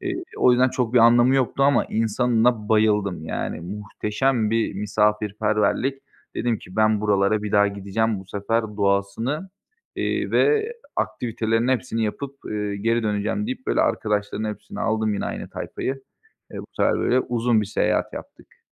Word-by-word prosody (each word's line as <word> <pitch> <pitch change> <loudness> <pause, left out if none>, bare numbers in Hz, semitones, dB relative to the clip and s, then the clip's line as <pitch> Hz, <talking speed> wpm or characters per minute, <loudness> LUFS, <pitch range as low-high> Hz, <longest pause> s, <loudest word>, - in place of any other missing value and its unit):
Eee, 360 -1 -3 0.2
o - - +5
yüzden 130 +1 +4
çok 125 -2 -2
bir - - +7
anlamı 120 +3 +6
yoktu 135 +1 +1
ama 140 +1 +4
insanına 115 0 +1
bayıldım. 105 -6 +2
Yani, 80 - -4
muhteşem 105 +5 -1
bir 115 -3 0
misafirperverlik. 105 +5 0 0.3
Dedim 120 -3 0
ki 90 - -13
ben 110 -1 +3
buralara 105 0 +2
bir 105 - -4
daha 100 0 +5
gideceğim, 100 +2 -1
bu 95 - -12
sefer 105 +4 -1
doğasını, 100 - -1 0.5
eee, - - -1
ve 440 +1 +2 0.2
aktivitelerin 115 +1 -1
hepsini 120 -3 0
yapıp, 140 +6 -4
eee, 105 -1 -2
geri 115 +3 0
döneceğim 105 - -1
deyip, 260 +1 -5
böyle, 315 - +2
arkadaşların 105 - -1
hepsini 100 - -10
aldım, 110 -1 0
yine - - -3
aynı - - -6
tayfayı. 135 0 -4 0.5
Eee, - - -6
bu - - -10
sefer, - - +2
böyle, 130 - +2
uzun 120 -2 +1
bir 105 - -3
seyahat 105 - 0
yaptık. - - -11
110 Hz, 155 wpm, -23 LUFS, 105-125 Hz, 0.5 s, bir